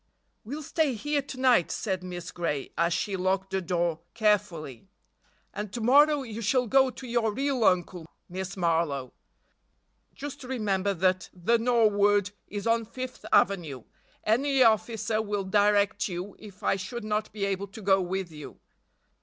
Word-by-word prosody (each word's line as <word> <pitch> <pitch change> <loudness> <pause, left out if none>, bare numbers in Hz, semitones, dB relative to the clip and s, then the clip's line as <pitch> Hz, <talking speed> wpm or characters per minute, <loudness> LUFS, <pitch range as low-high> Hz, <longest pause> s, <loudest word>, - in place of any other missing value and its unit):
"We'll 285 +8 -6
stay 295 -3 0
here 290 +5 -1
to 265 -1 -9
night," 250 -9 +4
said 190 -4 -2
Miss 180 0 -6
Gray, 155 -6 -3
as 170 +2 +1
she 195 +3 -1
locked 190 +1 -1
the 190 0 0
door 170 -2 -1 0.2
carefully, 195 - 0 0.7
"and 210 -1 -5
to 240 - -3
morrow 285 +5 +5
you 230 -2 -6
shall 250 +4 +2
go 265 +3 +4
to 255 - -10
your 235 -2 +1
real 270 +1 -1
uncle, 180 -3 +1 0.2
Miss 190 +2 -6
Marlowe. 165 -7 0 1.0
Just 285 0 -7
remember 205 -6 -1
that 185 +1 +1
'The 225 +7 +2
Norwood' 205 -4 +3 0.2
is 205 -1 -5
on 230 0 +2
Fifth 255 +3 -7
avenue; 160 - +2 0.4
any 265 +4 +3
officer 220 -1 +2
will 205 -2 -2
direct 205 +1 +2
you 185 +1 -6
if 205 -1 -13
I 195 - +2
should 235 +5 -6
not 215 0 -2
be 205 -2 -2
able 200 0 -2
to 200 +3 -11
go 195 0 +4
with 185 -1 -3
you." 150 -2 -10
205 Hz, 155 wpm, -27 LUFS, 185-235 Hz, 1.0 s, morrow